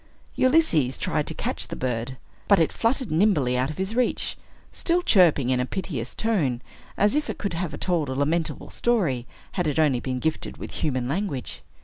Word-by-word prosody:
Ulysses 255 - +3
tried - - -1
to - - -3
catch - - -2
the - - -5
bird. 125 0 -3 0.3
But 200 - +6
it 165 - +3
fluttered 235 - 0
nimbly 155 -8 +3
out 130 +2 +1
of 155 - -6
his 190 +4 -2
reach, 250 0 0 0.4
still 350 +1 0
chirping 160 - +4
in 125 - +2
a 125 - +1
piteous 140 -8 -4
tone, 155 - 0 0.3
as 205 +3 +3
if 300 0 0
it - - -3
could 200 -4 -3
have 165 -4 -3
told 170 -6 0
a 130 - -2
lamentable 155 +4 -1
story, 170 - +1 0.2
had 180 -4 -1
it 150 - -1
only 145 -6 +3
been 130 0 -3
gifted 160 +4 -2
with - - -7
human 130 -5 0
language. 145 -3 -3
155 Hz, 190 wpm, -25 LUFS, 130-200 Hz, 0.4 s, But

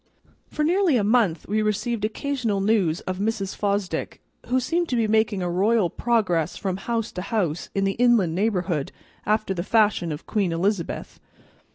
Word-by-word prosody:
For 300 - -2
nearly 345 -3 +3
a 215 - +1
month 205 -7 +2
we 215 +2 +1
received 215 +1 -1
occasional 230 -2 -1
news 195 -5 +1
of 185 0 -4
Mrs. 205 -2 -2
Fosdick, 200 -2 -2 0.3
who 255 +1 +2
seemed 335 +7 -1
to 250 - 0
be 230 -2 +2
making 215 -3 +1
a 175 - -1
royal 195 0 +2
progress 185 -9 0
from 190 -2 -2
house 230 +2 -2
to 180 - -5
house 180 -6 -2
in 195 - +1
the 195 - +2
inland 230 -9 +4
neighborhood, 180 -6 -1 0.4
after 215 -2 +1
the 175 - -3
fashion 205 -4 +2
of 150 +1 -6
Queen 200 -5 0
Elizabeth. 175 +1 -2
210 Hz, 170 wpm, -24 LUFS, 185-230 Hz, 0.4 s, inland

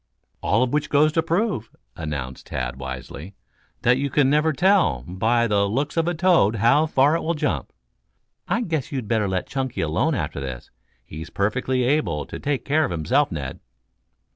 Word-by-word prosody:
"All 115 +4 +2
of 130 - -2
which 150 0 0
goes 150 +2 +4
to 165 - +2
prove," 165 - -1 0.3
announced 70 -5 -5
Tad 65 -1 -4
wisely, 65 +7 -7 0.5
"that 125 +2 +4
you 140 0 -1
never 150 +4 +3
can 145 - -8
tell, 130 - +3
by 110 +7 +1
the 100 -2 +1
looks 140 +7 -1
of 165 0 +1
a 175 - 0
toad, 165 - +3
how 120 +9 +3
far 145 +1 +3
it 165 - -1
will 170 +1 -1
jump. 150 -1 -2 0.8
I 235 - 0
guess 160 - -2
you'd 130 -6 -3
better 110 -2 +1
let 95 -1 -1
Chunky 130 -2 -3
alone 90 - +1
after 75 - -3
this. 65 -3 -7 0.3
He's 80 +3 -8
perfectly 125 +5 0
able 120 - 0
to - - -8
take 140 -4 -2
care 155 +3 +2
of - - -1
himself, 120 - +1
Ned." 70 -5 -5
125 Hz, 180 wpm, -23 LUFS, -, 0.8 s, goes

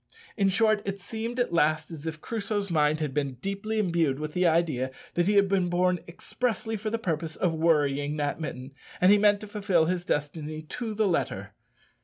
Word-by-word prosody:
In 195 -3 +2
short, 215 +1 +3
it 195 0 -4
seemed 225 +5 -5
at 240 -8 0
last 155 0 +2
as 160 -1 -7
if 155 -1 -5
Crusoe's 205 -3 -2
mind 155 -1 +2
had 150 -4 -2
been 140 -2 -1
deeply 200 - -3
imbued 170 -9 +1
with 150 0 -5
the 180 0 +3
idea 160 -6 +1 0.2
that 175 +1 +1
he 205 - +3
had 200 -1 +5
been 190 -2 +1
born 180 0 +2
expressly 225 +5 -2
for 215 +1 -3
the 230 - -1
purpose 165 -7 -2
of 175 -3 0
worrying 150 -3 +1
that 145 +2 -2
mitten, 130 -3 -6 0.3
and 180 +2 +6
he 205 - +6
meant 205 -1 +4
to 210 - -7
fulfil 200 -5 +1
his 175 +1 -1
destiny 155 0 -3
to 220 +7 -5
the 215 -1 +2
letter. 120 - -1
175 Hz, 200 wpm, -27 LUFS, 155-205 Hz, 0.3 s, and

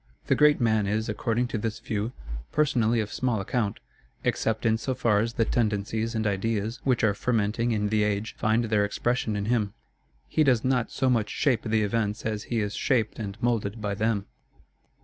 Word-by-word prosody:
The - - +3
great 150 0 +5
man 110 -4 +2
is, 110 +2 0
according 115 +3 0
to 115 - -2
this 110 0 -2
view, 110 +2 -3 0.4
personally 120 -6 +2
of 105 - -5
small 125 -4 0
account, 100 +1 -1 0.4
except 110 +1 0
in 110 0 +3
so 130 +4 -2
far 115 -4 +2
as 115 +2 -1
the 115 - +1
tendencies 110 +1 -1
and 110 0 -1
ideas 105 +3 -1
which 130 -3 +1
are 105 -2 +4
fermenting 115 +1 0
in 105 -2 0
the 110 0 +2
age 105 +1 -1
find 110 +2 +1
their 105 -2 +2
expression 110 +1 -1
in 100 0 -2
him. 110 -3 0 0.5
He 155 - +2
does 125 -6 +3
not 130 -2 +1
so 130 - -1
much 115 -5 +2
shape 135 -6 +1
the 110 -1 +1
events 105 0 -1
as 110 -1 -2
he 115 -2 +1
is 105 0 -2
shaped 115 -3 0
and 100 -2 -5
moulded 115 -3 0
by 105 -1 -2
them. 105 -1 0
110 Hz, 190 wpm, -27 LUFS, 105-120 Hz, 0.5 s, great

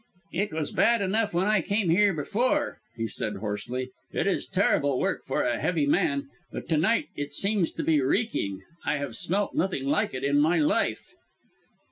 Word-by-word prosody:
"It 200 +2 -1
was 155 -2 -2
bad 235 -3 +3
enough 210 +3 +1
when 175 +2 +1
I 210 -2 +3
came 200 0 0
here 205 +4 +5
before," 245 - 0 0.2
he 115 0 -1
said 105 -1 -3
hoarsely. 110 +5 -4 0.2
"It - - -1
is 195 - 0
terrible 145 -8 +2
work - - -1
for - - 0
a - - 0
heavy 160 -5 +1
man. 140 -1 +1 0.2
But - - -6
to 160 - +3
night 225 - +2
it 145 0 -5
seems 200 -3 +1
to - - -3
be 155 -3 +3
reeking. 130 - -1 0.2
I 150 - 0
have 140 -5 -4
smelt 195 - -1
nothing 175 -7 -1
like 140 - +1
it 130 - -4
in 140 +1 +3
my 160 +4 +3
life." 150 -2 0
160 Hz, 185 wpm, -27 LUFS, 140-200 Hz, 0.2 s, here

